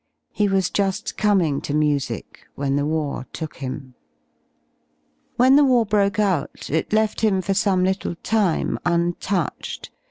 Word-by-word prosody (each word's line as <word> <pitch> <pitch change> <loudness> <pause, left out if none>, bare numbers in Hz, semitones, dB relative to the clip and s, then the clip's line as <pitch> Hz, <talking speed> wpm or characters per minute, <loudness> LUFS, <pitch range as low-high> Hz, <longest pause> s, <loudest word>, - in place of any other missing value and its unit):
He 210 - +1
wasjuSi 195 +2 0
coming 185 -9 +2
to 145 - -3
music 145 -7 -2
whenthewartook 145 +1 -2
him. 130 0 -6 1.4
J 245 - +4
IVhen 265 +1 +6
the 295 - +6
war 250 -4 +4
broke 200 -2 +1
out, 190 -13 -1
it 160 +2 -1
left 215 0 +1
him 210 -4 +2
for 190 +1 -1
some 195 -2 +2
little 190 -2 -1
time 205 -6 +1
untouched. 175 0 -2
185 Hz, 125 wpm, -22 LUFS, 150-205 Hz, 1.4 s, IVhen